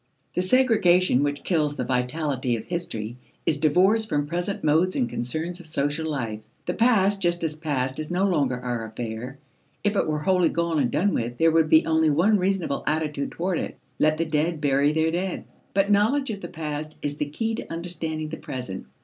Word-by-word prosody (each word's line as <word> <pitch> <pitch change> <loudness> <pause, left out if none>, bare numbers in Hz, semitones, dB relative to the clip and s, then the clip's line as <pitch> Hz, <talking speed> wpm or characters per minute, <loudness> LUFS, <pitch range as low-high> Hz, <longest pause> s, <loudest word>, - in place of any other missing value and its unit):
The - - +1
segregation 185 - +4
which 145 0 -1
kills 150 -5 +1
the - - -2
vitality 130 0 -1
of 110 - -6
history 120 -10 -4 0.3
is 150 - +2
divorce 185 +9 +4
from 145 -9 -1
present 175 +6 -3
modes 160 +5 +3
and 255 -3 +1
concerns 160 +8 -3
of 175 - -11
social 150 +1 -1
life. 115 -8 -3 0.3
The - - -1
past 205 -4 +3
just 175 -1 +1
as 155 -2 -1
past 135 -4 -2
is 155 - -4
no 180 +2 +1
longer 140 -9 +1
our 120 -2 -3
affair. 115 +3 -6 0.5
If 205 0 +1
it - - +1
were 155 -1 0
wholly 180 0 +3
gone 170 -2 0
and 130 -4 +2
done 200 +3 +1
with, 120 +1 -2
there 165 +3 +4
would 160 -1 +3
be 160 0 +6
only 160 -1 +3
one 190 +8 +3
reasonable 185 -6 0
attitude 150 -2 -1
toward 175 0 -1
it. - - -5 0.2
Let 155 0 +3
the 165 - 0
dead 155 +1 0
bury 145 0 +3
their 160 +1 +1
dead. 180 +2 -2 0.3
But 200 +1 +3
knowledge 225 +6 +3
of 200 -2 -6
the - - -5
past 155 -2 -5
is 145 0 -2
the 150 - -2
key 225 +9 -2
to 225 - -6
understanding 165 -2 -4
the 160 - -5
present. 125 -8 -6
160 Hz, 200 wpm, -25 LUFS, 145-180 Hz, 0.5 s, be